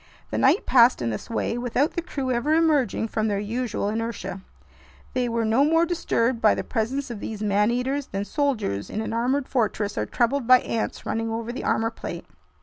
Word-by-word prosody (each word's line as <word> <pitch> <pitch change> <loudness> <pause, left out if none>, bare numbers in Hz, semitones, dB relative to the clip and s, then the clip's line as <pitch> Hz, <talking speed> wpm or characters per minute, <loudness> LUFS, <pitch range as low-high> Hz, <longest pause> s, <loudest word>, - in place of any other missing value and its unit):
The - - -1
night - - +3
passed 245 -1 +5
in 115 - 0
this 110 - -6
way, 230 +1 -1
without 250 +5 +1
the 345 - -3
crew 275 -6 -3
ever 260 +6 +1
emerging 295 -9 +2
from 220 0 0
their 205 -2 0
usual 220 +1 -2
inertia. 210 -3 -3 0.7
They 250 -1 0
were 230 -1 0
no 225 +5 +3
more 325 +3 +4
disturbed 255 -8 0
by 215 - +5
the - - -3
presence 255 +4 -2
of 225 - -6
these 215 0 -5
man 210 +1 +2
eaters 260 +3 -1
than 195 +1 -3
soldiers 225 - -1
in - - -4
an 220 - -4
armored 255 +4 0
fortress 215 -4 -1
are - - -1
troubled 245 +1 0
by 255 0 +7
ants 225 - -3
running 225 0 -2
over 230 +1 -3
the 255 - -5
armor 225 0 +1
plate. - - -7
235 Hz, 200 wpm, -24 LUFS, 220-265 Hz, 0.7 s, by